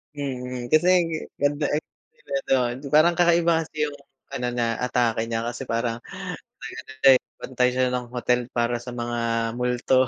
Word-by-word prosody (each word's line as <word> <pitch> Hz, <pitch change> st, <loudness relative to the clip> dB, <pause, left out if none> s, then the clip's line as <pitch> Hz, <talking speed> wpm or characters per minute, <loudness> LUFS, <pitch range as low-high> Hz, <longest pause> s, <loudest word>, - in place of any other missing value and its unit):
Mm, 125 Hz, -3 st, -4 dB
kasi 155 Hz, +3 st, +5 dB, 0.2 s
g -, -, -2 dB, 0.3 s
ganda 145 Hz, +1 st, +1 dB
eksena 360 Hz, -, -6 dB
dun. 125 Hz, -2 st, +2 dB
Yung 135 Hz, -, -9 dB
parang 170 Hz, +3 st, +6 dB
kakaiba 170 Hz, -1 st, +4 dB
kasi 160 Hz, -1 st, -7 dB
yung 145 Hz, -1 st, -2 dB, 0.4 s
ano 125 Hz, -, -3 dB
niya, 120 Hz, -1 st, +1 dB, 0.2 s
atake 120 Hz, -3 st, +1 dB
niya 115 Hz, 0 st, -2 dB
kasi 120 Hz, +2 st, -5 dB
parang 115 Hz, 0 st, -1 dB, 0.6 s
nag-ano 130 Hz, -, -8 dB
din, 135 Hz, -2 st, +8 dB, 0.2 s
bantay 125 Hz, -1 st, +1 dB
siya 130 Hz, -1 st, +2 dB
ng 125 Hz, -1 st, -2 dB
hotel 125 Hz, 0 st, +1 dB
para 120 Hz, 0 st, +1 dB
sa 125 Hz, +1 st, -8 dB
mga 120 Hz, 0 st, -3 dB, 0.4 s
multo. 125 Hz, +1 st, +2 dB
125 Hz, 160 wpm, -24 LUFS, 120-145 Hz, 0.6 s, din